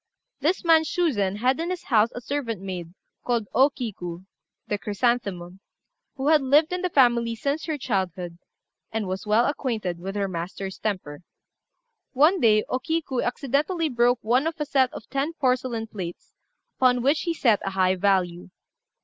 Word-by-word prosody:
This 335 Hz, +6 st, 0 dB
man 325 Hz, -1 st, +6 dB
Shuzen 270 Hz, -, 0 dB
had 255 Hz, +7 st, +1 dB
in 335 Hz, +2 st, -2 dB
his 365 Hz, -1 st, -4 dB
house 225 Hz, -2 st, +3 dB
a 245 Hz, -, -5 dB
servant 240 Hz, -5 st, -3 dB
maid, 180 Hz, -3 st, -6 dB, 0.3 s
called 235 Hz, -4 st, 0 dB
O 270 Hz, +3 st, +5 dB
Kiku 185 Hz, -9 st, -6 dB, 0.4 s
(the 205 Hz, -, -2 dB
Chrysanthemum), 200 Hz, -5 st, -1 dB, 0.6 s
who 275 Hz, +1 st, 0 dB
had 310 Hz, -2 st, +5 dB
lived 295 Hz, +5 st, +3 dB
in 360 Hz, -, -2 dB
the 365 Hz, -, 0 dB
family 240 Hz, -5 st, +3 dB
since 280 Hz, +6 st, -2 dB
her 310 Hz, -2 st, -2 dB
childhood, 185 Hz, -, -3 dB, 0.5 s
and 220 Hz, -1 st, -2 dB
was 190 Hz, +3 st, -4 dB
well 220 Hz, +3 st, +4 dB
acquainted 220 Hz, -, -2 dB
with 195 Hz, +3 st, -6 dB
her 200 Hz, -1 st, 0 dB
master's 190 Hz, +2 st, -5 dB
temper. 180 Hz, -8 st, -4 dB, 0.9 s
One 310 Hz, +8 st, +4 dB
day 215 Hz, -5 st, +4 dB
O 255 Hz, -, -1 dB
Kiku 305 Hz, -3 st, -1 dB
accidentally 295 Hz, +6 st, 0 dB
broke 245 Hz, -1 st, +3 dB
one 250 Hz, +7 st, +2 dB
of 325 Hz, 0 st, -4 dB
a 300 Hz, -, -1 dB
set 270 Hz, -3 st, +2 dB
of -, -, -10 dB
ten 280 Hz, +4 st, -2 dB
porcelain 250 Hz, -5 st, 0 dB
plates, 185 Hz, -6 st, -8 dB, 0.5 s
upon 250 Hz, -2 st, +3 dB
which 285 Hz, +4 st, +3 dB
he 340 Hz, -, -1 dB
set 230 Hz, -9 st, +3 dB
a -, -, -1 dB
high 190 Hz, -1 st, +2 dB
value. 185 Hz, -2 st, 0 dB
240 Hz, 165 wpm, -25 LUFS, 195-285 Hz, 0.9 s, man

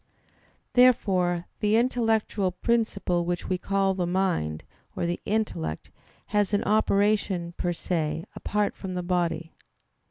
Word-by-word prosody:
Therefore 185 Hz, -9 st, +3 dB
the 210 Hz, +1 st, +3 dB
intellectual 225 Hz, -5 st, +1 dB
principle 200 Hz, -4 st, 0 dB
which 175 Hz, +1 st, -3 dB
we 185 Hz, -1 st, -1 dB
call 195 Hz, 0 st, +1 dB
the 180 Hz, -2 st, -1 dB
mind 175 Hz, -, 0 dB, 0.3 s
or -, -, -1 dB
the 175 Hz, 0 st, -1 dB
intellect 200 Hz, -, -2 dB, 0.4 s
has 205 Hz, -1 st, +2 dB
an 205 Hz, -, 0 dB
operation 200 Hz, -4 st, +1 dB
per 175 Hz, -, -1 dB
se 165 Hz, -2 st, -2 dB
apart 210 Hz, 0 st, -1 dB
from 185 Hz, -2 st, -6 dB
the 180 Hz, -, -2 dB
body. 170 Hz, -2 st, -1 dB
185 Hz, 125 wpm, -26 LUFS, 175-210 Hz, 0.4 s, Therefore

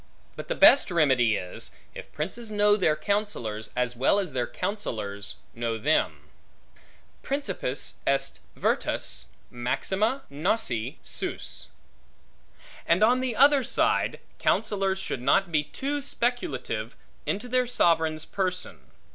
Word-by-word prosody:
But -, -, -7 dB
the -, -, -1 dB
best 290 Hz, -, +7 dB
remedy 130 Hz, -, +3 dB
is, 90 Hz, -2 st, -5 dB, 0.2 s
if -, -, -10 dB
princes 215 Hz, +9 st, -4 dB
know 205 Hz, 0 st, +4 dB
their 180 Hz, -7 st, +2 dB
counsellors, 155 Hz, -, -2 dB
as 125 Hz, 0 st, 0 dB
well 130 Hz, +10 st, +3 dB
as 185 Hz, -8 st, -2 dB
their 125 Hz, -2 st, 0 dB
counsellors 105 Hz, -, -4 dB, 0.2 s
know 115 Hz, -1 st, -2 dB
them: 150 Hz, +8 st, +1 dB, 0.9 s
Principis 200 Hz, -, -3 dB
est 135 Hz, 0 st, +1 dB, 0.2 s
virtus -, -, -1 dB, 0.2 s
maxima 195 Hz, -, 0 dB
nosse 150 Hz, -, -1 dB
suos. -, -, -4 dB, 1.2 s
And 170 Hz, +5 st, +4 dB
on 245 Hz, +3 st, +5 dB
the 255 Hz, -3 st, -1 dB
other 280 Hz, +1 st, +6 dB
side, -, -, +1 dB, 0.2 s
counsellors 195 Hz, -3 st, +1 dB
should 130 Hz, -, -4 dB
not 170 Hz, +8 st, +3 dB
be 150 Hz, -2 st, +2 dB
too 285 Hz, -, -3 dB
speculative 250 Hz, +2 st, -2 dB, 0.3 s
into 205 Hz, +5 st, -2 dB
their 250 Hz, 0 st, +1 dB
sovereign's 160 Hz, -8 st, +2 dB
person. 185 Hz, -2 st, -2 dB
185 Hz, 120 wpm, -27 LUFS, -, 1.2 s, best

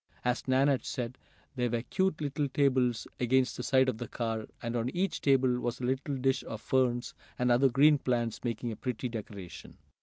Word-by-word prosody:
As 125 Hz, +1 st, 0 dB
Nan 130 Hz, +2 st, +4 dB
had 140 Hz, -3 st, +2 dB
said, 125 Hz, -1 st, -4 dB, 0.4 s
there 125 Hz, -1 st, 0 dB
were 115 Hz, 0 st, -1 dB
cute 190 Hz, +2 st, 0 dB
little 145 Hz, 0 st, -1 dB
tables 130 Hz, -4 st, +2 dB
against 130 Hz, +1 st, +2 dB
the -, -, -5 dB
side 130 Hz, +1 st, +3 dB
of 125 Hz, -4 st, -1 dB
the 120 Hz, -, -4 dB
car, 115 Hz, -2 st, -3 dB
and 115 Hz, +1 st, -4 dB
on 120 Hz, +1 st, 0 dB
each 190 Hz, +2 st, -1 dB
table 130 Hz, -3 st, +3 dB
was 120 Hz, 0 st, -3 dB
a -, -, -7 dB
little 135 Hz, +3 st, -1 dB
dish 135 Hz, +1 st, +1 dB
of 110 Hz, -, -6 dB
ferns, 125 Hz, 0 st, 0 dB, 0.2 s
and 125 Hz, 0 st, +2 dB
other 130 Hz, +3 st, +5 dB
green 145 Hz, +4 st, +5 dB
plants, 120 Hz, -4 st, -1 dB
making 120 Hz, 0 st, -2 dB
a -, -, -5 dB
pretty 125 Hz, 0 st, -3 dB
decoration. 105 Hz, -5 st, -8 dB
125 Hz, 195 wpm, -30 LUFS, 120-135 Hz, 0.4 s, other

